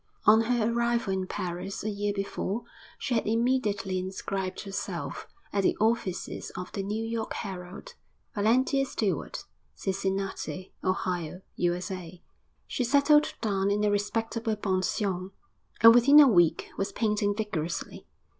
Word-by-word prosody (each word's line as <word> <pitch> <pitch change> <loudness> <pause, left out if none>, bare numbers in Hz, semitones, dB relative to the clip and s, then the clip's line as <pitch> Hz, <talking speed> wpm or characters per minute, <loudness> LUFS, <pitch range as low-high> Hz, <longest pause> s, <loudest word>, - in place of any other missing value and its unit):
On 220 +1 +7
her 235 -1 +1
arrival 235 -3 +1
in 190 -1 -2
Paris, 180 +3 -4
a 215 - -1
year 205 0 -1
before, 200 +2 -3 0.3
she 260 - -2
had 225 - +1
immediately 220 -5 +1
inscribed 190 0 -4
herself, 195 -1 -5 0.3
at 200 - +2
the - - +2
offices 215 -4 -1
of 180 0 -6
the 195 - -3
New 210 +3 -2
York 225 -1 -3
Herald, 190 - -7 0.4
Valentia 255 +6 +2
Stewart, 215 -7 -2 0.3
Cincinnati, 195 -1 -3
Ohio, 180 -2 -2 0.2
U.S.A. 180 0 -2 0.5
She 255 - -2
settled 285 +4 +4
down 200 -3 +1
in 205 +1 +1
a 210 - +3
respectable 225 +2 -1
pension, 190 -1 -1 0.5
and 230 0 +10
within 270 +5 +7
a 290 - +9
week 175 -8 +3
was 195 - -1
painting 210 -2 0
vigorously. 185 -7 -4
205 Hz, 130 wpm, -28 LUFS, 190-230 Hz, 0.5 s, and